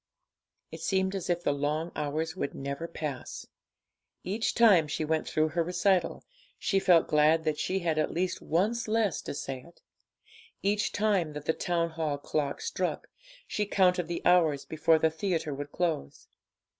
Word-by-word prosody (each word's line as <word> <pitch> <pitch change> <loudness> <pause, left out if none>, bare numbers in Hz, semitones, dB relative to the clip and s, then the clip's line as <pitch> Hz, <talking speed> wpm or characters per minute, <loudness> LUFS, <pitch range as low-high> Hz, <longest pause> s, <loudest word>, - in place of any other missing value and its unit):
It - - -8
seemed 190 0 +1
as 190 -2 -4
if 175 0 0
the - - +2
long 150 +4 -1
hours 155 +3 -2
would 140 - -3
never 140 +4 -4
pass 150 -6 -6
away. - - -35 0.8
Each 225 +2 -1
time 200 -10 +6
she 155 +2 -2
went 160 +1 0
through 155 0 +1
her 170 +3 0
recital, 180 +1 +1 0.3
she 195 - +1
felt 175 -4 +4
glad 155 +2 +4
that 155 -2 -1
she 190 - 0
had 160 -2 0
at 155 - +1
least 180 +2 -2
once 215 +9 0
less 215 -5 +1
to - - -6
say 135 -2 -5
it. 170 +5 -19 0.8
Each 205 +1 +1
time 200 -7 +1
that 150 0 -7
the 160 - +2
Town 170 -1 -1
Hall 160 -3 -2
clock 145 0 -2
struck, 460 +1 -3 0.4
she 210 -1 -2
counted 180 -4 +2
the 170 0 -4
hours 160 -6 +4
before 160 +1 +3
the 160 0 +2
theatre 160 -2 -2
would 145 +1 -6
close. 165 - -2
165 Hz, 170 wpm, -29 LUFS, 150-185 Hz, 0.8 s, time